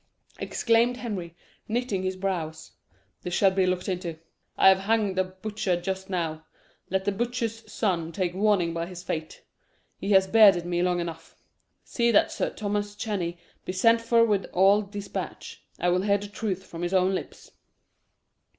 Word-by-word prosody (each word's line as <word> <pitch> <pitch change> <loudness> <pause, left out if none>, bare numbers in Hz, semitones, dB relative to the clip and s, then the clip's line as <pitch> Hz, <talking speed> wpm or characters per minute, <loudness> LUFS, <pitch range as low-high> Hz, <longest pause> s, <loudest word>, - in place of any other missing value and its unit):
exclaimed 235 +1 +2
Henry, 195 -9 -5 0.3
knitting 225 -4 -1
his 185 0 -2
brows. 170 -5 -4 0.5
"This 175 0 -3
shall 195 0 +4
be 190 -1 +2
looked 180 0 -1
into. 175 -3 -3 0.4
I - - +7
have 190 0 +5
hanged 205 -2 +1
a - - +4
butcher 190 0 -3
just 190 +1 -4
now. 165 -4 -2 0.5
Let 190 +1 -1
the 205 - +2
butcher's 225 0 -3
son 170 -6 -1
take 180 0 -2
warning 190 -4 +2
by 170 0 -3
his 180 -1 -9
fate. 155 -2 -5 0.6
He 195 - -4
has 190 0 +6
bearded 195 -4 +6
me 175 0 -1
long 180 0 +1
enough. 165 -1 -6 0.5
See 235 -1 0
that 220 - +4
Sir - - -1
Thomas 205 0 -3
Cheney 190 -6 -3 0.3
be 185 - -4
sent 230 +4 +4
for 230 0 +4
with 205 -4 +1
all 195 +3 +5
despatch. 205 0 -7 0.2
I 175 - +2
will 180 +1 +2
hear 200 0 +2
the 205 0 -8
truth 200 -2 -3
from 165 - -8
his 175 +2 -1
own 185 +1 +3
lips." 185 - -6
190 Hz, 170 wpm, -26 LUFS, 175-210 Hz, 0.6 s, I